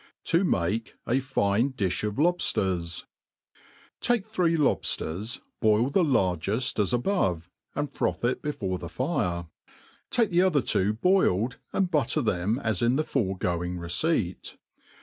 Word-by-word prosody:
To 170 +3 +2
male 100 - +1 0.3
a 125 +3 +2
fine 130 -1 +1
Dijb 100 -2 -1
of 105 - -4
Lobjiers. 95 - 0 1.0
TAKE 240 -5 +1
three 180 -6 +1
lobfters, 110 - -1 0.2
boil 110 +4 +3
the 190 - +3
largeft 105 - 0
as 100 - +2
above, 115 - 0 0.2
and 145 0 -2
froth - - -1
it 125 - 0
before 95 -11 -3
the 85 - -7
fire. 85 +1 -1 0.6
Take 230 -5 +1
the 175 +1 +4
other 175 -7 +3
two 100 +3 +2
boiled, 125 - +2
and 190 -2 0
butter 145 -1 +1
them 100 +1 0
as 110 -4 0
in 120 +2 +3
the 155 - +1
foregoing 90 - -1
receipt. 90 - -1
115 Hz, 135 wpm, -27 LUFS, 95-150 Hz, 1.0 s, the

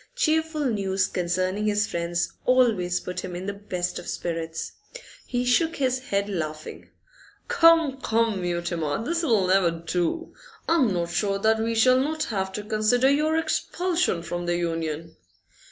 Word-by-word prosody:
Cheerful 320 -7 +1
news 195 -5 +1
concerning 185 +4 -1
his 210 +1 +2
friends 170 -2 -2
always 225 -9 +3
put 180 0 -5
him 180 - -6
in 180 +2 -5
the 200 - -3
best 185 -3 -4
of - - -10
spirits. 165 -1 -4 0.6
He 245 0 -1
shook 320 +7 +2
his 260 -2 0
head, 200 0 0
laughing. 155 -5 -5 0.6
'Come, 330 -5 +4
come, 225 -3 +1
Mutimer, 170 +1 -2
this'll 305 - +1
never 185 -1 +4
do! 170 - -2 0.3
I'm 315 -9 +3
not 170 -2 -1
sure 195 +3 0
that 220 +2 +2
we 225 +1 -1
shall 255 +3 +5
not 310 +3 -1
have 190 -1 -1
to 210 - -4
consider 220 +5 +2
your 305 +3 +2
expulsion 340 - 0
from 175 0 -4
the 175 0 +1
Union. 165 -1 -3
200 Hz, 150 wpm, -25 LUFS, 175-255 Hz, 0.6 s, shall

